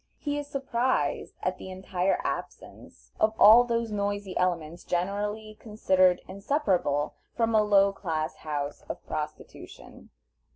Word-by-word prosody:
He 290 -1 -3
is 290 - -6
surprised 255 - -1
at 185 0 -1
the - - -8
entire 185 0 -1
absence - - -7
of 215 0 +2
all 225 +4 +9
those 235 -2 -1
noisy 205 -2 -2
elements 170 -2 -1
generally 205 +4 -3
considered 190 -4 +2
inseparable 195 - 0 0.2
from 230 -1 +1
a 215 - +5
low 200 -1 +4
class 160 -5 -3
house 145 -2 -4
of - - -6
prostitution. 150 0 -8
200 Hz, 125 wpm, -27 LUFS, 180-220 Hz, 0.2 s, all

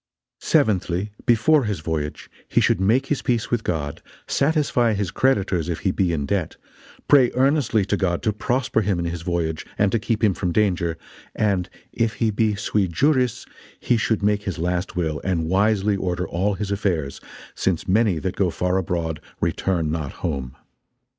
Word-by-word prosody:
Seventhly, 95 -1 +1 0.2
Before 125 +5 +4
his 100 -7 -2
Voyage, 75 -2 -3 0.2
He - - +2
should 90 - +2
make 115 +8 +3
his 145 0 -1
peace 120 -2 -1
with 120 -2 0
God, 75 -4 -3 0.2
satisfie 140 -6 +1
his 100 -3 -2
Creditors 100 - +1
if 85 - -3
he 95 - +1
be 90 -2 +1
in 75 -4 -1
debt; 95 -1 -1 0.5
Pray 135 -4 +6
earnestly 130 -5 +2
to 100 - 0
God 90 -3 -1
to 110 - +1
prosper 125 +2 0
him 100 -3 0
in 85 - -2
his 85 0 -3
Voyage, 80 -2 -2
and 100 -1 +2
to 115 - +1
keep 110 +1 -2
him 105 -3 +4
from 90 -1 -2
danger, 85 -4 +1 0.4
and, 100 -4 0 0.2
if 115 -1 0
he 115 -2 0
be 105 0 +1
'sui 100 -1 0
juris' 130 - +1 0.3
he 120 - +1
should 110 -2 0
make 105 0 +2
his 95 -4 -4
last 90 +2 -2
will, 80 -4 -1
and 85 -4 0
wisely 100 +3 +2
order 90 -1 -2
all 95 +4 0
his 100 0 -4
affairs, 85 -9 -1 0.3
since 95 -4 -1
many 100 -1 +3
that 95 +4 -3
go 95 -3 +1
far 90 +2 0
abroad, 85 -3 -2 0.2
return 85 -5 0
not 80 -4 -3
home. 70 -6 -3
95 Hz, 175 wpm, -23 LUFS, 85-110 Hz, 0.5 s, Pray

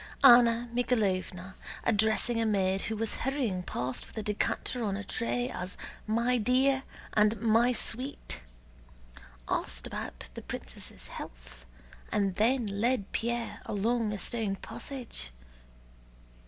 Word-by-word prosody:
Anna 240 -2 +8
Mikháylovna, 190 -6 0 0.3
addressing 220 +1 +3
a - - +2
maid 195 -2 +2
who 220 - -2
was 225 0 -2
hurrying 250 -8 0
past 130 -7 -3
with - - -14
a 220 - -1
decanter 215 +3 -1
on 200 -2 0
a 205 - -4
tray 245 +4 -1
as 180 -7 -5 0.3
"my 235 +3 +2
dear" 265 +4 +3 0.3
and 210 0 +4
"my 230 +2 +4
sweet," 235 - -3 1.1
asked - - -1
about - - -5
the - - -7
princess' - - -6
health 60 0 -9 0.5
and 200 -2 +2
then 240 +3 +3
led 205 +1 0
Pierre 235 0 -2
along 220 +2 +1
a 210 - -2
stone 210 0 -1
passage. 235 - -6
220 Hz, 125 wpm, -30 LUFS, 195-240 Hz, 1.1 s, Anna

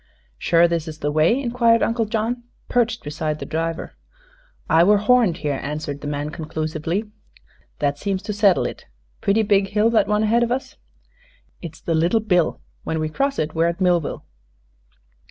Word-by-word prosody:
"Sure 170 0 +4
this 170 -1 -2
is 155 -1 -7
the 145 -1 -2
way?" 155 - +3
inquired 235 -3 +2
Uncle 230 0 +1
John, 225 +3 -2 0.3
perched 235 -1 0
beside 150 +1 -3
the - - -7
driver. 165 +1 -3 0.7
"I 165 +1 +5
were 205 +3 +5
horned 215 -4 +3
here," 145 -2 0
answered 145 -1 -5
the 145 - -5
man, 145 +1 -3
conclusively. 160 +6 -3 0.7
"That 145 -1 -1
seems 195 0 -2
to 210 0 -3
settle 200 -3 +3
it. - - -6 0.3
Pretty 210 +3 +2
big 200 -1 +2
hill, 210 +3 +2
that 215 -4 +3
one 210 0 +1
ahead 225 +2 +3
of 240 0 0
us." 260 +2 -3 0.9
"It's 165 -2 -9
the 165 - -1
Little 170 +8 +2
Bill. 180 -6 +1 0.2
When 160 - -2
we 155 0 -1
cross 275 - -1
it, 155 0 -2
we're 165 +1 +2
at 170 +2 -2
Millville." 175 -4 0
180 Hz, 175 wpm, -22 LUFS, 155-220 Hz, 0.9 s, I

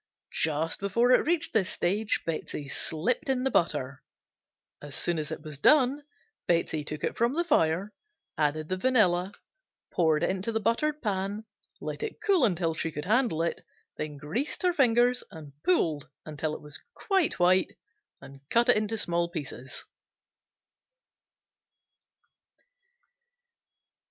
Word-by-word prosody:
Just 160 +1 0
before 230 +5 +2
it 255 - +4
reached 340 -1 +1
this 200 -4 +2
stage 205 +5 0
Betsey 155 -3 -4
slipped 235 - -2
in 255 -1 +1
the 265 - +1
butter. 140 -5 0 0.8
As 145 -2 -8
soon 170 -2 0
as 150 -1 -4
it - - -6
was 150 -3 -8
done 280 - +4 0.5
Betsey 165 -3 +1
took 150 +1 -5
it - - -1
from 235 +4 +1
the 340 - +1
fire, 195 - +1 0.4
added 155 0 0
the 185 - -1
vanilla, 190 -6 +3 0.6
poured 160 -2 +2
into 190 +5 0
the 220 - 0
buttered 285 +8 0
pan, 200 +1 -2 0.3
let - - -5
it 445 -2 -5
cool 395 - +3
until 175 -5 0
she 165 0 -2
could 150 -1 -5
handle 215 -6 +2
it, 170 - -2 0.3
then 150 -1 -5
greased 210 - -3
her 360 -1 +3
fingers 245 -3 +3
and 150 -3 -11
pulled 155 -6 +1 0.2
until 155 0 -3
it - - -10
was 150 0 -6 0.2
quite 385 -6 +1
white 185 +1 +3 0.5
and 135 0 -13
cut 235 +2 +3
into 215 -1 +3
small 170 -3 0
pieces. 135 -6 -7
185 Hz, 135 wpm, -28 LUFS, 155-245 Hz, 0.8 s, it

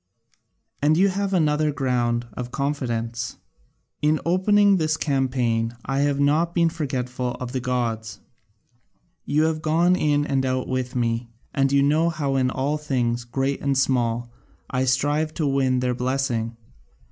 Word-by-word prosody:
And 150 +2 +3
you 195 +2 +4
have 195 +1 -2
another 155 -4 +2
ground 120 -4 0
of 125 +3 -5
confidence 120 -5 -2 0.6
in 155 +1 +2
opening 200 +3 +4
this 155 -1 0
campaign 125 -6 0
I 135 +1 -1
have 140 0 +1
not 155 +4 +2
been 170 -1 +4
forgetful 125 -5 -3
of 125 -1 -5
the 130 - -2
gods: 115 -4 -2 1.1
you 150 +2 +2
have 160 -1 0
gone 170 +4 +3
in 145 -4 +1
and 135 -2 0
out 130 -1 -1
with 130 0 -3
me, 115 -1 -1 0.2
and 135 0 +2
you 140 0 +4
know 155 +4 +3
how 145 -4 -2
in 130 -1 +2
all 140 +4 -1
things, 120 -5 -1
great 135 +3 -2
and 140 -1 +1
small, 120 -3 0 0.4
I 130 0 +1
strive 145 +4 +1
to 155 - -1
win 135 -2 +1
their 125 0 0
blessing. 125 -2 -1
135 Hz, 150 wpm, -23 LUFS, 125-150 Hz, 1.1 s, you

